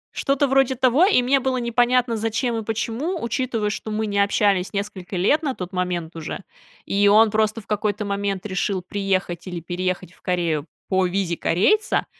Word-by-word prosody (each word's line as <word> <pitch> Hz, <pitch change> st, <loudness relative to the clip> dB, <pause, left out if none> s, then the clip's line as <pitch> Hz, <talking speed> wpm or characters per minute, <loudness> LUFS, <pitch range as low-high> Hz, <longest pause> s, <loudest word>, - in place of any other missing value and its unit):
Что-то 275 Hz, +1 st, +1 dB
вроде 270 Hz, -1 st, +3 dB
того, 260 Hz, +6 st, +4 dB
и 385 Hz, -, +4 dB
мне 270 Hz, +3 st, +3 dB
было 260 Hz, 0 st, -1 dB
непонятно, 245 Hz, 0 st, +2 dB
зачем 225 Hz, +2 st, -1 dB
и 225 Hz, -, -3 dB
почему, 230 Hz, -, -2 dB
учитывая, 235 Hz, -3 st, -1 dB
что 220 Hz, -, -5 dB
мы 215 Hz, +1 st, -1 dB
не 200 Hz, -1 st, -1 dB
общались 200 Hz, -2 st, +2 dB
несколько 200 Hz, -2 st, -5 dB
лет 205 Hz, -, +2 dB
на 275 Hz, -5 st, -2 dB
тот 180 Hz, +1 st, -7 dB
момент 180 Hz, -2 st, -2 dB
уже, 165 Hz, +3 st, -6 dB, 0.4 s
и 205 Hz, +1 st, +2 dB
он 215 Hz, +2 st, +6 dB
просто 215 Hz, +1 st, +1 dB
в -, -, -24 dB
какой-то 210 Hz, 0 st, -1 dB
момент 200 Hz, -1 st, -2 dB
решил 190 Hz, -1 st, -1 dB
приехать 190 Hz, -3 st, -2 dB
или 175 Hz, -2 st, -4 dB
переехать 180 Hz, +1 st, -3 dB
в -, -, -25 dB
Корею 170 Hz, -4 st, -1 dB, 0.2 s
по 190 Hz, -1 st, +2 dB
визе 180 Hz, -1 st, -1 dB
корейца, 410 Hz, -, +2 dB
205 Hz, 175 wpm, -22 LUFS, 185-240 Hz, 0.4 s, он